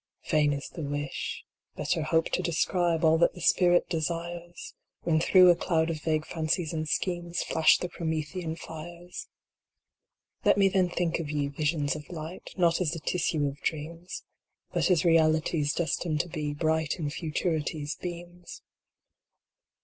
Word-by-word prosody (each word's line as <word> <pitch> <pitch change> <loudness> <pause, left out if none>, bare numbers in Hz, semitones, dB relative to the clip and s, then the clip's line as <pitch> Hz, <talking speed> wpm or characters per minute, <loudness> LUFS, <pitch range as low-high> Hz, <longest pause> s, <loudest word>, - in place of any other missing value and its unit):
Vain 150 -1 +4
is 140 -1 -3
the 170 - -8
wish. 145 -1 -4 0.3
Better - - -1
hope 160 +1 +2
to - - 0
describe 170 0 +1
All 160 0 +5
that 170 - +3
the - - -9
spirit 175 +1 +4
desires, 170 +1 -4 0.3
When 160 -2 +2
through 180 +2 +7
a - - +4
cloud 165 -1 +1
of 155 -2 -5
vague 155 0 0
fancies 160 0 -1
and 155 -1 -2
schemes 175 -1 -1
Flash 160 -1 +4
the 180 - -3
Promethean 160 0 -3
fires. 170 +2 -9 1.2
Let - - +4
me 195 -1 +5
then 185 -2 +2
think 175 -1 -1
of 160 -3 -4
ye, 145 -1 -1
Visions 150 0 0
of 150 -1 -9
Light, 165 +1 -7
Not 170 -1 +3
as 165 -3 +1
the 165 - -4
tissue 155 -2 0
of 140 0 -5
dreams, 165 +3 -4 0.5
But - - +2
as 175 -4 +3
realities 160 -2 +3
destined 165 -1 -1
to 175 - -9
be 150 -3 -3
Bright 160 +1 0
in 150 -4 -3
Futurity 160 -1 -2
s 145 - -3
beams. 175 0 -8
165 Hz, 155 wpm, -28 LUFS, 155-175 Hz, 1.2 s, through